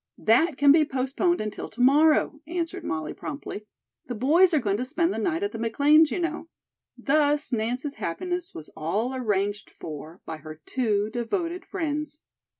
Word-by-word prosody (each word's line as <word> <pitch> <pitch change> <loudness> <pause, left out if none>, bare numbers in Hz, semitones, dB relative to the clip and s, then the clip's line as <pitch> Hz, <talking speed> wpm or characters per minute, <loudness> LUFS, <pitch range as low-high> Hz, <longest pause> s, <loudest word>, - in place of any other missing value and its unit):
"That 260 +7 +3
can 285 0 +6
be 310 +1 +6
postponed 275 +6 0
until 215 -1 -5
to 225 - -16
morrow," 295 +3 +4
answered 340 +1 -3
Molly 155 - -3
promptly. 275 -8 -7 0.4
"The 245 - -4
boys 320 - +4
are 315 - +3
going 205 -5 0
to 250 - -2
spend 335 +7 0
the - - -3
night 345 0 -1
at 405 - -1
the - - -6
McLean's, 290 +7 +4
you - - -2
know." 335 -1 -3 0.5
Thus 295 -1 +1
Nance's 245 +5 -2
happiness 355 - -3
was 155 - -8
all 205 +11 -2
arranged 205 -5 -1
for 155 +3 -8
by 160 - -5
her 155 0 -10
two 215 -4 0
devoted 335 - -3
friends. 300 -4 -3
275 Hz, 165 wpm, -26 LUFS, 215-325 Hz, 0.5 s, can